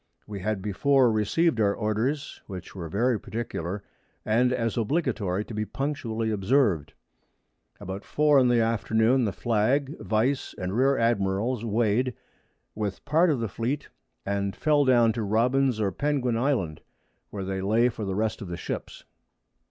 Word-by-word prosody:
We 105 -2 -6
had 95 0 -2
before 125 +5 +3
received 110 +6 +1
our 100 -1 +2
Orders, 115 +8 -2
which 95 -3 -8
were 85 -4 -6
very 115 +5 +1
particular, 100 -4 -5 0.4
and 120 +3 +3
as 115 -3 -1
obligatory 105 - -1
to - - -9
be 105 0 -1
punctually 115 -4 -3
observed. 105 - +1 0.9
About 95 +2 -6
4 150 -2 +3
in 130 - +4
the 120 -1 +3
Afternoon 115 +2 +2
the 105 - 0
Flag, 125 +8 0
Vice 120 +6 0
and 90 +2 -3
Rear 135 +3 +3
Admirals 115 +1 0
weigh'd, 115 +2 +1 0.6
with 105 -2 -4
part 165 +4 +3
of 145 -5 +1
the 115 - -1
Fleet, 120 +8 -3 0.4
and 100 0 -1
fell 150 -2 +2
down 120 -3 +4
to 115 - -3
Robins 120 +4 +2
or 100 -2 +1
Penguin 140 -4 0
Island, 115 - 0 0.5
where 100 -2 -5
they 95 0 -3
lay 110 +5 +3
for 115 -3 -4
the 95 -2 -2
rest 110 +1 -1
of 100 - -6
the 85 0 -5
Ships. - - -6
115 Hz, 155 wpm, -26 LUFS, 100-130 Hz, 0.9 s, in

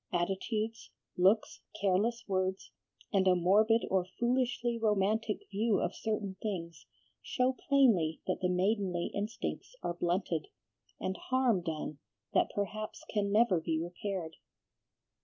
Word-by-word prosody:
Attitudes, 210 +5 -2 0.3
looks, 195 +5 +3 0.2
careless 205 +5 +1
words, 190 -1 -1 0.4
and 190 -1 +3
a 185 - +6
morbid 210 +6 +4
or 190 -1 +3 0.2
foolishly 245 -1 +1
romantic 215 0 +1
view 210 +1 +2
of - - -1
certain 210 -3 -3
things, 170 -6 -5 0.3
show 255 0 +1 0.2
plainly 220 - +4
that 185 - -1
the 180 - +2
maidenly 185 -1 0
instincts 215 - -4
are 175 - -1
blunted, 175 -2 -1 0.5
and 190 - -2
harm 255 -7 +3
done 155 -3 -4 0.3
that - - +3
perhaps 210 +2 -3
can 205 -2 +1
never 205 -5 +4
be 160 -1 -1
repaired." 175 0 -4
200 Hz, 120 wpm, -32 LUFS, 180-220 Hz, 0.5 s, a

